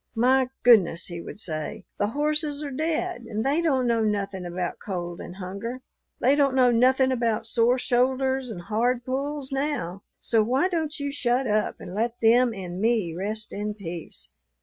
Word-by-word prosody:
'My 255 Hz, +2 st, +3 dB
goodness,' 195 Hz, -8 st, +5 dB
he 170 Hz, -1 st, -6 dB
would 195 Hz, -, -9 dB
say, 160 Hz, +2 st, -5 dB
'the 205 Hz, -, +2 dB
horses 300 Hz, +3 st, 0 dB
are 285 Hz, -, -4 dB
dead 320 Hz, +3 st, -2 dB
and 220 Hz, +1 st, -2 dB
they 290 Hz, +5 st, +2 dB
don't 270 Hz, -6 st, +2 dB
know 230 Hz, -2 st, +2 dB
nothin' 200 Hz, -3 st, -2 dB
about 175 Hz, 0 st, -3 dB
cold 175 Hz, -3 st, -5 dB
and 180 Hz, -, -8 dB
hunger. 200 Hz, +7 st, -6 dB, 0.4 s
They 260 Hz, -, +4 dB
don't 280 Hz, -2 st, +3 dB
know 250 Hz, -2 st, +5 dB
nothin' 260 Hz, +2 st, +4 dB
about 230 Hz, -3 st, 0 dB
sore 235 Hz, +2 st, +3 dB
shoulders 260 Hz, +1 st, +1 dB
and 180 Hz, -6 st, -7 dB
hard 240 Hz, +4 st, 0 dB
pulls 275 Hz, +1 st, -3 dB
now, 270 Hz, -, -2 dB, 0.2 s
so 225 Hz, -2 st, +2 dB
why 260 Hz, +11 st, +2 dB
don't 315 Hz, -4 st, -2 dB
you 285 Hz, 0 st, -2 dB
shut 255 Hz, -1 st, 0 dB
up 215 Hz, -2 st, 0 dB
and 180 Hz, -, -8 dB
let 230 Hz, +3 st, -1 dB
them 235 Hz, +2 st, +5 dB
and 185 Hz, -3 st, -6 dB
me 220 Hz, -7 st, +1 dB
rest 210 Hz, +5 st, -4 dB
in 210 Hz, +1 st, -3 dB
peace?' 170 Hz, -, -8 dB
235 Hz, 175 wpm, -25 LUFS, 200-265 Hz, 0.4 s, goodness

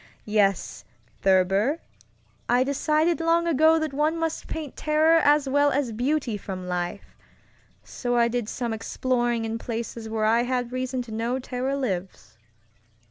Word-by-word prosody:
Yes, 205 Hz, -3 st, 0 dB, 0.4 s
Thurber, 195 Hz, -, +3 dB, 0.7 s
I 245 Hz, +1 st, +4 dB
decided 305 Hz, +5 st, +1 dB
long 335 Hz, +1 st, +2 dB
ago 320 Hz, 0 st, +4 dB
that 315 Hz, -3 st, -2 dB
one 305 Hz, +3 st, +1 dB
must 325 Hz, -1 st, -3 dB
paint 310 Hz, -4 st, -6 dB
terror 310 Hz, +2 st, +3 dB
as 290 Hz, -1 st, +4 dB
well 285 Hz, +2 st, +3 dB
as 280 Hz, -3 st, 0 dB
beauty 250 Hz, 0 st, -1 dB
from 185 Hz, -2 st, -7 dB
life, 180 Hz, +1 st, -4 dB, 0.7 s
so 245 Hz, -1 st, -3 dB
I 235 Hz, 0 st, +4 dB
did 235 Hz, -2 st, -2 dB
some 235 Hz, -2 st, -3 dB
exploring 240 Hz, +1 st, -1 dB
in 225 Hz, +1 st, -3 dB
places 230 Hz, -1 st, -5 dB
where 220 Hz, -1 st, -1 dB
I 230 Hz, +2 st, +4 dB
had 245 Hz, -1 st, -2 dB
reason 255 Hz, 0 st, -2 dB
to 235 Hz, -, -12 dB
know 230 Hz, +3 st, -1 dB
terror 260 Hz, +1 st, -3 dB
lives. 180 Hz, -, -4 dB
245 Hz, 145 wpm, -25 LUFS, 220-290 Hz, 0.7 s, I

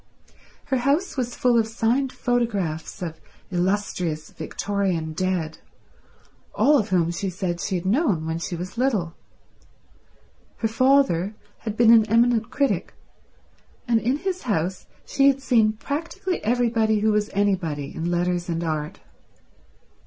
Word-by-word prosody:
Her 270 Hz, -2 st, 0 dB
house 280 Hz, +9 st, +1 dB
was 245 Hz, -3 st, -2 dB
full 245 Hz, -2 st, +3 dB
of 220 Hz, -, +1 dB
signed 240 Hz, +4 st, 0 dB
photographs 205 Hz, -11 st, -2 dB
of 160 Hz, -2 st, -6 dB, 0.3 s
illustrious 180 Hz, -4 st, -1 dB
Victorian 175 Hz, -1 st, -2 dB
dead, 170 Hz, -2 st, -2 dB, 1.0 s
all 290 Hz, 0 st, +5 dB
of 215 Hz, -1 st, -2 dB
whom 170 Hz, -3 st, +2 dB
she 190 Hz, +3 st, -3 dB
said 180 Hz, -2 st, -3 dB
she 190 Hz, -, -2 dB
had 175 Hz, 0 st, -3 dB
known 200 Hz, -, +1 dB
when 160 Hz, +1 st, -2 dB
she 175 Hz, +1 st, -4 dB
was 185 Hz, +7 st, -6 dB
little. 210 Hz, -11 st, 0 dB, 1.4 s
Her 225 Hz, -, 0 dB
father 225 Hz, -5 st, +2 dB, 0.2 s
had 220 Hz, -2 st, -5 dB
been 235 Hz, -1 st, +7 dB
an 220 Hz, -2 st, +5 dB
eminent 230 Hz, 0 st, +3 dB
critic, 280 Hz, +2 st, -1 dB, 0.9 s
and 235 Hz, -1 st, +3 dB
in 255 Hz, +5 st, +1 dB
his 370 Hz, +3 st, -3 dB
house 185 Hz, -5 st, -2 dB, 0.2 s
she 275 Hz, 0 st, +3 dB
had 275 Hz, -1 st, +4 dB
seen 225 Hz, -5 st, +3 dB
practically 330 Hz, -, -4 dB
everybody 225 Hz, -2 st, +2 dB
who 215 Hz, 0 st, +3 dB
was 210 Hz, 0 st, +1 dB
anybody 180 Hz, -8 st, -1 dB
in 165 Hz, +1 st, -3 dB
letters 175 Hz, 0 st, 0 dB
and 165 Hz, 0 st, -1 dB
art. 155 Hz, +2 st, -3 dB
210 Hz, 140 wpm, -24 LUFS, 175-245 Hz, 1.4 s, been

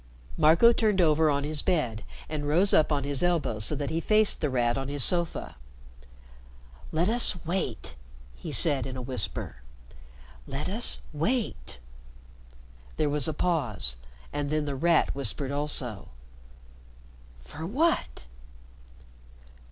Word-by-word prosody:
Marco 165 Hz, +9 st, +5 dB
turned 215 Hz, -4 st, +1 dB
over 160 Hz, -2 st, +3 dB
on 140 Hz, -1 st, 0 dB
his 150 Hz, 0 st, -2 dB
bed 120 Hz, -, -1 dB, 0.2 s
and 150 Hz, -2 st, -4 dB
rose 175 Hz, +7 st, +3 dB
up 155 Hz, -, +3 dB
on 145 Hz, -2 st, 0 dB
his 140 Hz, -1 st, -1 dB
elbow 170 Hz, -11 st, 0 dB
so 110 Hz, +8 st, +2 dB
that 145 Hz, 0 st, -4 dB
he 160 Hz, -, -1 dB
faced 215 Hz, +4 st, +3 dB
The 150 Hz, -, 0 dB
Rat 120 Hz, -2 st, 0 dB
on 135 Hz, 0 st, -4 dB
his 140 Hz, -1 st, +1 dB
sofa. 170 Hz, -, 0 dB, 1.3 s
"Let 165 Hz, +3 st, 0 dB
us 235 Hz, -3 st, +4 dB
wait," 155 Hz, -, -3 dB, 0.4 s
he -, -, -8 dB
said 140 Hz, -5 st, +3 dB
in 130 Hz, -1 st, -7 dB
a -, -, -5 dB
whisper. 125 Hz, -, -1 dB, 0.9 s
"Let 135 Hz, +2 st, -4 dB
us 225 Hz, +5 st, +1 dB, 0.2 s
wait." 160 Hz, -, -2 dB, 1.2 s
There 150 Hz, -, +1 dB
was 145 Hz, -3 st, 0 dB
a -, -, -1 dB
pause, 125 Hz, -, -1 dB, 0.4 s
and 145 Hz, -1 st, -3 dB
then 155 Hz, 0 st, -1 dB
The 140 Hz, -1 st, -3 dB
Rat 165 Hz, +4 st, +2 dB
whispered 140 Hz, 0 st, -4 dB
also. 140 Hz, -7 st, -3 dB, 1.4 s
"For 155 Hz, -, -8 dB
what?" 305 Hz, -, -1 dB
150 Hz, 135 wpm, -27 LUFS, 135-170 Hz, 1.4 s, Marco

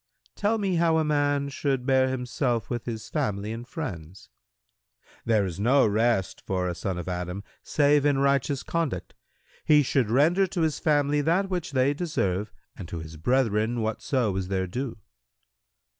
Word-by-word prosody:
Q -, -, -32 dB
"Tell 210 Hz, +2 st, +1 dB
me 195 Hz, -4 st, 0 dB
how 165 Hz, -1 st, +3 dB
a 160 Hz, -, +2 dB
man 145 Hz, -2 st, +1 dB
should 135 Hz, -2 st, -1 dB
bear 130 Hz, -1 st, +3 dB
himself 125 Hz, -2 st, -2 dB
with 120 Hz, -2 st, -3 dB
his 115 Hz, -2 st, -5 dB
family 105 Hz, -8 st, -2 dB
and 120 Hz, +2 st, -7 dB
friends."—"There 110 Hz, -, -6 dB
is 90 Hz, -1 st, -5 dB
no 130 Hz, +6 st, +4 dB
rest 110 Hz, -2 st, +1 dB
for 90 Hz, -1 st, -1 dB
a 90 Hz, -, -1 dB
son 90 Hz, +1 st, -3 dB
of 90 Hz, -, -6 dB
Adam 90 Hz, +2 st, -4 dB, 0.2 s
save 145 Hz, -1 st, +3 dB
in 145 Hz, -2 st, +3 dB
righteous 140 Hz, 0 st, +1 dB
conduct: 160 Hz, -, -2 dB, 0.5 s
he 150 Hz, -1 st, +5 dB
should 130 Hz, -4 st, +1 dB
render 165 Hz, -, +3 dB
to 180 Hz, -1 st, -3 dB
his 160 Hz, -2 st, 0 dB
family 145 Hz, -1 st, +2 dB
that 175 Hz, +6 st, +1 dB
which 175 Hz, -5 st, -3 dB
they 130 Hz, +2 st, +3 dB
deserve 105 Hz, -, -1 dB, 0.2 s
and 90 Hz, -, -8 dB
to 85 Hz, -, -6 dB
his 80 Hz, 0 st, -8 dB
brethren 115 Hz, -, +1 dB
whatso 110 Hz, 0 st, -1 dB
is 95 Hz, -1 st, -2 dB
their 95 Hz, -1 st, -1 dB
due." 120 Hz, +7 st, -4 dB
125 Hz, 165 wpm, -26 LUFS, 105-145 Hz, 0.5 s, he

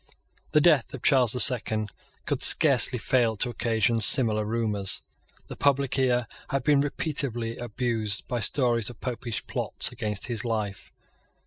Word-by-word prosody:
The 150 Hz, -, +4 dB
death 150 Hz, -7 st, +2 dB
of 130 Hz, -, -12 dB
Charles 130 Hz, -5 st, +4 dB
the 125 Hz, -, -2 dB
Second 110 Hz, -5 st, +2 dB, 0.3 s
could -, -, -2 dB
scarcely -, -, +2 dB
fail 120 Hz, -4 st, 0 dB
to 120 Hz, +4 st, +1 dB
occasion 115 Hz, -1 st, 0 dB
similar 110 Hz, -2 st, +4 dB
rumours. 105 Hz, -4 st, +1 dB, 0.4 s
The -, -, -9 dB
public 140 Hz, -2 st, 0 dB
ear 125 Hz, -2 st, +1 dB, 0.2 s
had 135 Hz, -3 st, -2 dB
been 145 Hz, 0 st, +3 dB
repeatedly 135 Hz, -6 st, -2 dB
abused 115 Hz, -3 st, -3 dB
by 120 Hz, -2 st, -3 dB
stories 120 Hz, -1 st, +1 dB
of 120 Hz, -5 st, -13 dB
Popish 120 Hz, -2 st, -5 dB
plots -, -, -2 dB
against 105 Hz, -2 st, -4 dB
his 115 Hz, -4 st, -1 dB
life. 110 Hz, -4 st, -4 dB
120 Hz, 145 wpm, -25 LUFS, 110-130 Hz, 0.4 s, The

